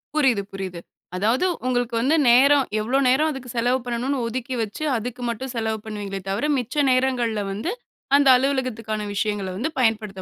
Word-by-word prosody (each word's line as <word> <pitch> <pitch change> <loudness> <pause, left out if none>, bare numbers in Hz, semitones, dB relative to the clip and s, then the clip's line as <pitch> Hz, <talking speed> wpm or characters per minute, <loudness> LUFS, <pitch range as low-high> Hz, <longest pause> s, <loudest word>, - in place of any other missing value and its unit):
புரியுது, 255 -9 +3
புரியுது. 190 -3 -5 0.4
அதாவது 225 - +1 0.2
உங்களுக்கு 245 -2 0
வந்து 290 +6 +3
நேரம் 275 +3 +6 0.2
எவ்ளோ 250 +5 +1
நேரம், 285 +5 +3
அதுக்கு 265 -3 -8
செலவு 245 +2 +2
பண்ணனும்ன்னு 245 +2 -2
ஒதுக்கி 255 +2 -4
வைச்சு 220 +7 -4
அதுக்கு 245 +2 -6
மட்டும் 250 +3 -4
செலவு 220 -1 -1
பண்ணுவீங்களே 205 -3 -5
தவிர 205 +9 -1
மிச்ச 250 +1 -4 0.2
நேரங்கள்ல 250 -4 +1
வந்து 215 - -3 0.4
அந்த 285 -1 +4
அலுவலகத்துக்கான 245 -6 -2
விஷயங்கள 205 -1 -1
வந்து 255 +10 -1
பயன்படுத்த 215 -5 0
240 Hz, 155 wpm, -23 LUFS, 215-260 Hz, 0.4 s, நேரம்